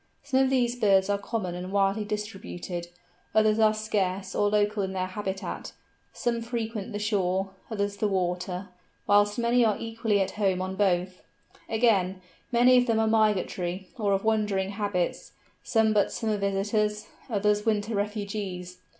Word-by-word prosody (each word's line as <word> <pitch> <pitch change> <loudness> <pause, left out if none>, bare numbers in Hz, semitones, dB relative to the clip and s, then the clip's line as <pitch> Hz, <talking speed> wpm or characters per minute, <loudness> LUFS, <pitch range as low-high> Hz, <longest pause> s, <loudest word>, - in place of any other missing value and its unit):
Some 275 -2 +1
of 265 -1 +4
these 245 -2 +2
birds 200 -4 +3
are 200 - 0
common 200 -4 -3
and 180 +1 -6
widely 200 +1 +2
distributed; 200 -4 -5 0.5
others 215 0 +4
are 215 -1 +6
scarce 195 -3 -2
or 205 - +2
local 210 0 +1
in 190 -1 -2
their 185 -1 -1
habitat; 190 +1 -5 0.4
some 235 -1 -1
frequent 230 -2 -4
the 205 - -3
shore, 195 -2 0 0.2
others 205 -2 -2
the 215 - +1
water; 180 0 -2 0.4
whilst 205 +1 +4
many 240 +1 +3
are 215 -3 +2
equally 225 -2 -1
at 190 - 0
home 190 -2 +2
on 185 +1 -3
both. 185 -2 0 0.5
Again, 200 -5 +2 0.3
many 250 +1 +6
of 245 0 +3
them 225 -1 +2
are 220 - +3
migratory, 195 -4 0
or 210 -5 0
of 195 - 0
wandering 210 -3 +1
habits; 200 -4 -2 0.3
some 220 -1 +2
but 205 -1 +2
summer 220 -2 -1
visitors, 210 +2 0 0.2
others 210 -1 +1
winter 215 0 0
refugees. 200 -3 -4
205 Hz, 155 wpm, -27 LUFS, 190-220 Hz, 0.5 s, are